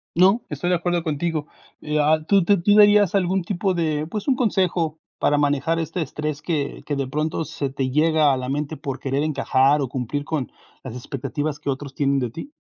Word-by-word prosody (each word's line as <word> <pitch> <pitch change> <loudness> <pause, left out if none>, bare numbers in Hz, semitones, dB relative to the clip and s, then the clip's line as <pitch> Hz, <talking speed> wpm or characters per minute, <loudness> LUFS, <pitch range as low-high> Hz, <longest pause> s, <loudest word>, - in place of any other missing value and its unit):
No, 190 +7 +5
estoy 155 +4 -3
de - - +4
acuerdo 175 0 -1
contigo. 160 0 -2 0.3
Eh, 150 0 -1
ah, 155 +1 +4
¿tú 200 -3 +4
tú 200 -1 +3
tú 205 +3 +4
dirías 205 -2 +6
algún 190 -1 +1
tipo 190 +1 -1
de, 155 -3 -1
pues, 210 +3 -5
un 270 - +3
consejo 180 - 0 0.2
para 145 - +2
manejar 145 +3 +1
este 165 +2 -3
estrés 150 0 -4
que 150 -3 -3
que 145 - -2
de 135 -1 -2
pronto, 155 +3 -2
se 140 -2 -4
te 135 -1 -2
llega 150 0 +3
a - - 0
la 130 0 -4
mente 150 +2 -3
por 135 -1 -5
querer 135 +2 -1
encajar 140 -1 +2
o 135 - -2
cumplir 130 +3 -3
con 150 -6 -3 0.3
las 125 -2 -7
expectativas 140 +4 -4
que - - -4
otros 135 0 -4
tienen 140 -1 +1
de 125 - -2
ti? 220 - -8
150 Hz, 210 wpm, -22 LUFS, 140-170 Hz, 0.3 s, dirías